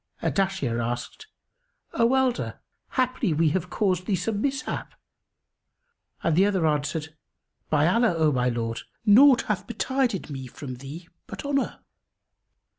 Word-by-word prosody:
Ardashir 190 -12 0
asked, 120 +1 -5 0.7
"O 235 +2 +3
elder, 260 -2 0 0.3
haply 255 - +1
we 160 +1 +3
have 180 +3 -2
caused 185 -3 0
thee 200 - +2
some 205 +4 -2
mishap?"; 275 +2 -3 1.3
and 165 - +2
the 190 +4 +5
other 190 -5 +1
answered, 155 +1 -1 0.6
"By 150 -1 +3
Allah, 190 +2 +3
O 155 -2 +3
my 125 -2 +1
lord, 115 -1 -3 0.2
naught 255 +5 +7
hath 210 -3 -2
betided 245 -2 -1
me 135 -2 -6
from 130 0 -8
thee 145 +7 -9 0.2
but - - -7
honour!" 275 -1 -1
185 Hz, 130 wpm, -26 LUFS, 150-235 Hz, 1.3 s, naught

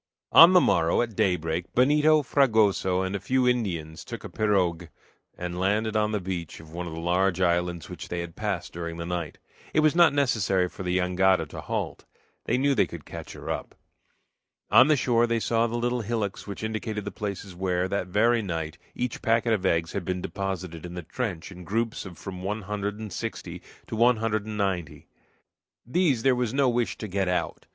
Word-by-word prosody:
On 170 +3 +9
the 180 - +8
morrow, 85 - +3
at 115 -3 -6
daybreak, 85 -2 -1
Benito, 150 +4 +4
Fragoso, 110 -9 +2
and 95 +1 -2
a - - -1
few 130 +4 +1
Indians 85 -10 -1
took - - -8
a - - -7
pirogue 90 -5 +1 0.5
and 90 0 -4
landed 105 +3 +1
on 105 0 +2
the 105 - 0
beach 90 -3 -5
of 80 -1 -13
one 85 +1 -5
of 80 - -6
the 80 - -5
large 90 +2 +1
islands 85 -2 0
which - - -8
they 85 0 -3
had 85 -1 -8
passed 100 -5 -3
during 85 -1 -5
the 85 - -4
night. 85 -2 -4 0.4
It 155 - +5
was 155 -1 +4
not 170 -3 +6
necessary 110 -10 +1
for 90 - -10
the 90 -1 0
jangada 95 +1 +2
to - - -7
halt. - - -4 0.4
They 120 - +1
knew 140 +2 +2
they - - +3
could 85 -4 -9
catch - - -8
her - - -6
up. - - -5 1.0
On 130 - +8
the 155 - +5
shore 120 -2 +2
they 115 0 +1
saw 115 +1 +1
the 120 +1 -3
little 120 +1 0
hillocks 110 -3 -3
which 100 +1 -6
indicated 110 -1 -3
the 100 - -4
places 100 -1 -5
where, 90 0 -1
that 95 -1 -2
very 115 +5 +3
night, 80 -5 -4 0.2
each 125 -1 -3
packet 115 0 +2
of 95 -3 +1
eggs 80 -1 +1
had 100 - -3
been 90 +1 -2
deposited 95 -4 -4
in 90 0 -7
the 90 - -5
trench 95 -2 -4
in 90 -1 -10
groups 110 +2 -2
of 90 - -11
from 95 -1 -7
one 105 +3 -3
hundred 105 +1 -3
and 105 -4 -7
sixty - - -5 0.2
to - - -5
one 120 +1 +4
hundred 110 -1 -1
and 105 -1 -5
ninety. 90 -7 -2 0.8
These 135 -3 +1
there 135 - +5
was 125 -1 -1
no 140 -2 +4
wish 120 -1 0
to 110 - -5
get 95 -1 -1
out. 90 -2 -2
100 Hz, 205 wpm, -26 LUFS, 90-115 Hz, 1.0 s, On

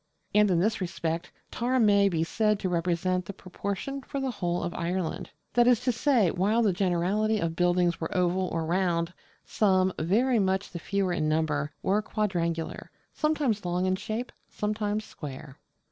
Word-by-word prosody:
And 210 0 +5
in 175 -2 +3
this 210 +3 +1
respect 170 -1 -3 0.2
Tara 250 +2 0
may 200 -3 +5
be 165 -3 0
said 210 +4 +1
to 190 -2 -2
represent 180 +1 0
the 200 - -6
proportion 200 +8 -5
for 275 +1 -5
the 270 -1 -1
whole 175 -5 -2
of 175 - -3
Ireland: 180 +1 -3 0.2
that 240 0 +4
is 245 -3 +5
to 250 0 +1
say, 230 - +2
while 210 +6 +2
the 205 -4 +3
generality 195 +4 +1
of 165 -2 -2
buildings 175 -1 +2
were 160 - -2
oval 180 +1 +1
or 165 -1 -1
round, 170 0 0 0.3
some 190 -3 +2
very 230 +8 +2
much 190 0 0
the 170 - -6
fewer 195 +1 -1
in 155 -3 0
number 150 -2 0
were 200 +3 +2
quadrangular, 170 -7 -2 0.2
sometimes 295 -9 0
long 180 +1 0
in 185 0 +2
shape, 215 +5 -4 0.2
sometimes 210 0 -2
square. 140 -4 -9
185 Hz, 170 wpm, -28 LUFS, 175-215 Hz, 0.3 s, And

